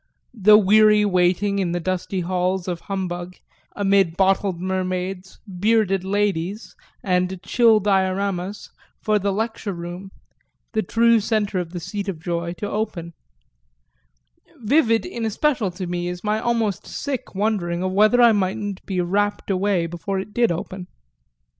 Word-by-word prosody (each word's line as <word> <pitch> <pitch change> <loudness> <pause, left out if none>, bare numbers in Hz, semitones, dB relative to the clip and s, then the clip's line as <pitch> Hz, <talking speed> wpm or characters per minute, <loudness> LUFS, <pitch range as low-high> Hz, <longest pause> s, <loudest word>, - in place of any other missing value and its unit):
the 210 -2 +6
weary 210 +1 +5
waiting, 190 +1 +1
in 175 -3 -1
the 175 - -1
dusty 185 +1 -2
halls 180 +1 -1
of 175 -2 -3
humbug, 180 -2 -5 0.4
amid 195 -4 +2
bottled 190 -1 +2
mermaids, 185 0 -3 0.2
"bearded 205 -2 +2
ladies" 200 0 -2 0.3
and 180 0 0
chill 225 +1 +4
dioramas, 195 0 -1 0.3
for 215 -1 +1
the 200 0 0
lecture 220 0 -3
room, 175 +2 -7 0.6
the 220 - 0
true 230 +3 +3
centre 210 -3 0
of 175 -2 -4
the 175 - -5
seat 200 +3 -5
of 175 -5 -5
joy, 170 0 -3
to 180 +4 -5
open: 185 -6 -4 1.4
vivid 230 -1 +2
in 240 -10 -5
especial 225 0 0
to 180 +1 -6
me 175 0 -3
is 180 0 -5
my 215 +1 0
almost 225 -4 -1
sick 270 -8 -5
wondering 190 -4 -1
of 185 - -1
whether 215 +5 +4
I 235 - +7
mightn't 200 -1 -2
be 185 -2 -1
rapt 205 +3 -1
away 190 -2 +1
before 175 +4 -4
it 200 +2 -7
did 240 -5 +2
open. 180 +2 -5
195 Hz, 145 wpm, -22 LUFS, 180-210 Hz, 1.4 s, I